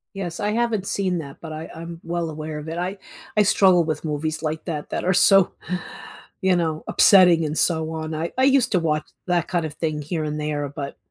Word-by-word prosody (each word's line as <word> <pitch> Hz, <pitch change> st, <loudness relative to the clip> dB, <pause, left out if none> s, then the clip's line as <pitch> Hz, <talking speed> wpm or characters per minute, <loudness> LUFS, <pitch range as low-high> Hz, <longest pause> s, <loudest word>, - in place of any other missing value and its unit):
Yes, 175 Hz, -3 st, -5 dB
I 205 Hz, 0 st, 0 dB
haven't 225 Hz, -3 st, 0 dB
seen 185 Hz, -3 st, 0 dB
that, 140 Hz, -3 st, -8 dB
but 160 Hz, -2 st, -7 dB
I 155 Hz, +1 st, -7 dB
I'm 165 Hz, +1 st, -8 dB
well 170 Hz, 0 st, -2 dB
aware 155 Hz, 0 st, -6 dB
of 150 Hz, +1 st, -7 dB
it. 165 Hz, +1 st, -4 dB
I 185 Hz, +3 st, -3 dB, 0.4 s
I 210 Hz, -, +6 dB
struggle 185 Hz, -3 st, +5 dB
with 155 Hz, -1 st, -3 dB
movies 155 Hz, +1 st, -2 dB
like 155 Hz, 0 st, -3 dB
that 155 Hz, -4 st, -4 dB
that -, -, -3 dB
are 185 Hz, -, +3 dB
so, 195 Hz, +1 st, +5 dB, 0.9 s
you 190 Hz, -1 st, +3 dB
know, 160 Hz, -3 st, -1 dB
upsetting 180 Hz, -4 st, +6 dB
and 150 Hz, +1 st, -3 dB
so 160 Hz, -2 st, +1 dB
on. 160 Hz, 0 st, -4 dB
I 165 Hz, +2 st, -3 dB
I 260 Hz, -, +3 dB
used 275 Hz, -2 st, +3 dB
to 180 Hz, -, +4 dB
watch 155 Hz, -2 st, -1 dB, 0.2 s
that 175 Hz, -2 st, +1 dB
kind 175 Hz, -3 st, -1 dB
of 155 Hz, -, -5 dB
thing 155 Hz, -1 st, -2 dB
here 155 Hz, +2 st, -3 dB
and 150 Hz, 0 st, -3 dB
there, 150 Hz, -1 st, -2 dB
but 140 Hz, 0 st, -6 dB
165 Hz, 220 wpm, -23 LUFS, 155-180 Hz, 0.9 s, I